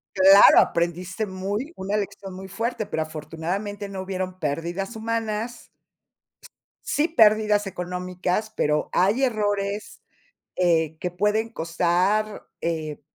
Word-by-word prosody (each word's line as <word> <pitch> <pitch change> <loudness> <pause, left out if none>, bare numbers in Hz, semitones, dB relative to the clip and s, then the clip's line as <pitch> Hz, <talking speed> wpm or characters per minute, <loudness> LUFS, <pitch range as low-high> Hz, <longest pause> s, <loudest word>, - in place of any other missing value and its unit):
Claro, 195 +1 +8
aprendiste 175 +5 0
muy 200 - -4
una 195 +2 -3
lección 200 -2 -4
muy 190 +1 -8
fuerte, 230 +3 -3
pero 160 - -1
afortunadamente 175 +7 -5
no 195 -1 -5
hubieron 185 -1 -4
pérdidas 170 +7 -3
humanas. 225 +1 -3 1.2
Sí 300 +2 +1
pérdidas 215 - +4
económicas, 180 +3 -3
pero 150 0 0
hay 205 +9 +3
errores, 205 -4 -1 0.5
eh, 160 -3 +2
que 180 - -3
pueden 210 +5 0
costar, 185 +5 0
eh, 160 -3 -3
195 Hz, 110 wpm, -24 LUFS, 175-215 Hz, 1.2 s, Claro